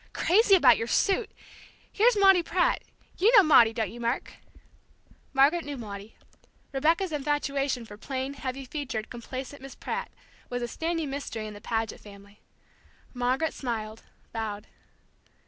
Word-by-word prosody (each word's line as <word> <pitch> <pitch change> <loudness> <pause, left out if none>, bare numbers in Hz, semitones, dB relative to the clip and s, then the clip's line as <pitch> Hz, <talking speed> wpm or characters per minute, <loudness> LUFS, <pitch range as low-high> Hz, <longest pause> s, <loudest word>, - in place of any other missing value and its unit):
Crazy 400 +2 +4
about 260 -10 +6
your 230 - -3
suit! 400 - +1 0.6
Here's 455 +2 +3
Maudie 385 -3 +6
Pratt. 350 +1 +1 0.4
You 415 +6 +5
know 405 - +9
Maudie, 240 -8 +6
don't 225 -1 -2
you, 240 - -10
Mark?" 235 +2 -2 1.0
Margaret 285 +5 +4
knew 290 -1 -6
Maudie. 205 -2 -8 0.6
Rebecca's 325 +6 +1
infatuation 280 -3 -1
for 205 -1 -11
plain, 265 +4 -4
heavy 270 -1 -5
featured, 255 -6 -5
complacent 260 +3 -7
Miss 270 0 -10
Pratt 480 +1 -4 0.4
was 245 0 -3
a - - -2
standing 325 +1 -3
mystery 250 -6 -5
in 215 - -7
the 205 - -11
Paget 225 -1 -2
family. 200 0 -15 0.7
Margaret 255 +5 0
smiled, 225 -4 -4 0.3
bowed. 215 -2 -4
270 Hz, 140 wpm, -27 LUFS, 225-320 Hz, 1.0 s, know